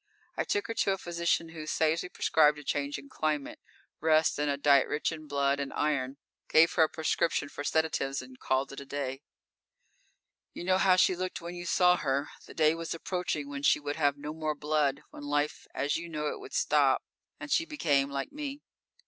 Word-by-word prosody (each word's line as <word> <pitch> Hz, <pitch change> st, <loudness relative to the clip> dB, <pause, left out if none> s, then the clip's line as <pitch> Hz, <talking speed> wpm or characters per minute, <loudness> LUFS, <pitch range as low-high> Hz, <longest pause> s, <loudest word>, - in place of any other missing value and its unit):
I -, -, -1 dB
took 410 Hz, 0 st, 0 dB
her -, -, -3 dB
to 200 Hz, -3 st, +1 dB
a -, -, -3 dB
physician 170 Hz, -2 st, -1 dB
who 155 Hz, -2 st, -8 dB
sagely 160 Hz, +3 st, +1 dB
prescribed 150 Hz, -3 st, +3 dB
a 150 Hz, -, -9 dB
change 145 Hz, 0 st, -2 dB
in 140 Hz, 0 st, -11 dB
climate, 150 Hz, -1 st, -2 dB, 0.4 s
rest 155 Hz, -1 st, +3 dB
and 150 Hz, 0 st, +1 dB
a 140 Hz, -, 0 dB
diet 140 Hz, -1 st, +4 dB
rich 150 Hz, -, -1 dB
in 155 Hz, -1 st, -8 dB
blood 140 Hz, 0 st, +1 dB
and 140 Hz, -1 st, -3 dB
iron, 140 Hz, -3 st, -1 dB, 0.3 s
gave 165 Hz, +1 st, +5 dB
her 165 Hz, -, +3 dB
a 160 Hz, -, +5 dB
prescription 160 Hz, -2 st, 0 dB
for 145 Hz, -, -6 dB
sedatives, 145 Hz, -3 st, 0 dB
and 130 Hz, 0 st, -11 dB
called 130 Hz, +1 st, 0 dB
it 140 Hz, -, -7 dB
a 140 Hz, -, -9 dB
day._ 135 Hz, -1 st, -4 dB, 1.4 s
_You 175 Hz, -, -5 dB
know 185 Hz, 0 st, +3 dB
how 190 Hz, -1 st, +5 dB
she 185 Hz, 0 st, +4 dB
looked 185 Hz, +1 st, -4 dB
when 170 Hz, +1 st, -7 dB
you 175 Hz, 0 st, -7 dB
saw 180 Hz, 0 st, +4 dB
her. 140 Hz, 0 st, -1 dB, 0.2 s
The -, -, -12 dB
day 155 Hz, -1 st, +4 dB
was 165 Hz, 0 st, -4 dB
approaching 165 Hz, -4 st, -3 dB
when 140 Hz, 0 st, -5 dB
she 145 Hz, -, +4 dB
would 145 Hz, 0 st, -4 dB
have 145 Hz, -2 st, +2 dB
no 150 Hz, +1 st, -6 dB
more 155 Hz, -1 st, -2 dB
blood, 150 Hz, -2 st, 0 dB
when -, -, -10 dB
life 145 Hz, +1 st, -1 dB
as 145 Hz, -, -1 dB
you 170 Hz, +1 st, -7 dB
know 150 Hz, -2 st, -2 dB
it -, -, -5 dB
would 410 Hz, +1 st, -11 dB
stop -, -, +3 dB, 0.4 s
and 300 Hz, -, -7 dB
she 330 Hz, -, +3 dB
would -, -, -28 dB
become 145 Hz, -, +1 dB
like 140 Hz, -1 st, -4 dB
me. 290 Hz, -1 st, -6 dB
150 Hz, 210 wpm, -30 LUFS, 140-170 Hz, 1.4 s, gave